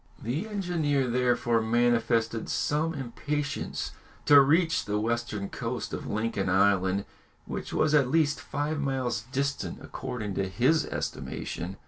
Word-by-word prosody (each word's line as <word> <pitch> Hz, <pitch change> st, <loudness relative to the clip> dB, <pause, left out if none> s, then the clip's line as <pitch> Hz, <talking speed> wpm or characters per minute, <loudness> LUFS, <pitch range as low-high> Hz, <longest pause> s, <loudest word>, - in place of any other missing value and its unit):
] -, -, -26 dB
The 145 Hz, -, -2 dB
engineer 170 Hz, -10 st, 0 dB
therefore 120 Hz, -1 st, +2 dB
manifested 115 Hz, 0 st, +1 dB
some 160 Hz, +2 st, 0 dB
impatience 140 Hz, +3 st, -3 dB, 0.3 s
to 145 Hz, -1 st, +9 dB
reach 160 Hz, +4 st, +3 dB
the 105 Hz, 0 st, -1 dB
western 110 Hz, -3 st, -2 dB
coast -, -, -4 dB
of -, -, -4 dB
Lincoln 105 Hz, -3 st, -1 dB
Island, 95 Hz, 0 st, +3 dB, 0.4 s
which -, -, -5 dB
was 155 Hz, -1 st, +2 dB
at 140 Hz, -4 st, +4 dB
least 150 Hz, -1 st, +2 dB
five 145 Hz, +2 st, -2 dB
miles 130 Hz, -5 st, -1 dB
distant 140 Hz, +1 st, -2 dB
according 120 Hz, -6 st, -5 dB
to 95 Hz, 0 st, -1 dB
his 130 Hz, +11 st, +2 dB
estimation. 90 Hz, +3 st, -4 dB
125 Hz, 130 wpm, -28 LUFS, 110-145 Hz, 0.4 s, to